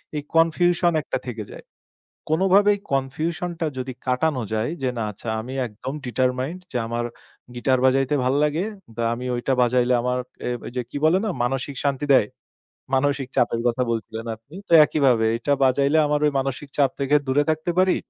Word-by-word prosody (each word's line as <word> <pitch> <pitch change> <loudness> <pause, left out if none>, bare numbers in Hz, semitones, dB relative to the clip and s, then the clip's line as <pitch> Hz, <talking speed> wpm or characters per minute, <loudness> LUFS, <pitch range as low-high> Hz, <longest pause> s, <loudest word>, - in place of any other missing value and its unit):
এই 150 - -1
confusion 175 +2 +3
একটা - - -3
থেকে 115 -3 -4
যায়। - - -11 0.7
কোনভাবেই 195 +5 +4
confusion 155 +6 -1
টা 165 - +1
যদি 130 0 -4
কাটানো 130 +1 +1
যায় 110 +5 0
যে, 130 - +1
না, - - -1
"আচ্ছা 105 +3 -9
আমি 125 +4 -7
একদম 115 +5 -7
determined 130 +7 -1
যে 125 - 0
আমার 120 +1 -2 0.5
গিটার 130 +2 +1
বাজাইতে 135 +2 +3
ভাল 130 - +2
লাগে। 150 +5 0 0.3
দা 115 - -1
আমি 125 +2 -7
ঐটা 125 +2 0
বাজাইলে 125 +1 +3
আমার 125 0 0 0.2
অ্যা 120 -1 -4
যে 125 - 0
কি - - -6
বলে 165 +4 +5
না, 215 - -1
মানসিক 135 +2 -2
শান্তি 140 0 0
দেয়।" 105 - +4 0.7
মানসিক 140 0 +1
চাপের 115 -1 +2
কথা 120 +1 +1
বলছিলেন 115 0 -4
আপনি। 115 +8 -19
তো - - -4
একইভাবে 130 -7 +2
"এইটা 145 +5 -1
বাজাইলে 140 +4 +3
আমার 150 0 +1
ওই 150 - +2
মানসিক 135 +1 -3
চাপ 140 -2 +3
থেকে 140 +1 +1
দূরে 135 +2 +3
থাকতে 155 +2 -1
পারি, 185 0 +4
135 Hz, 175 wpm, -23 LUFS, 125-150 Hz, 0.7 s, বলে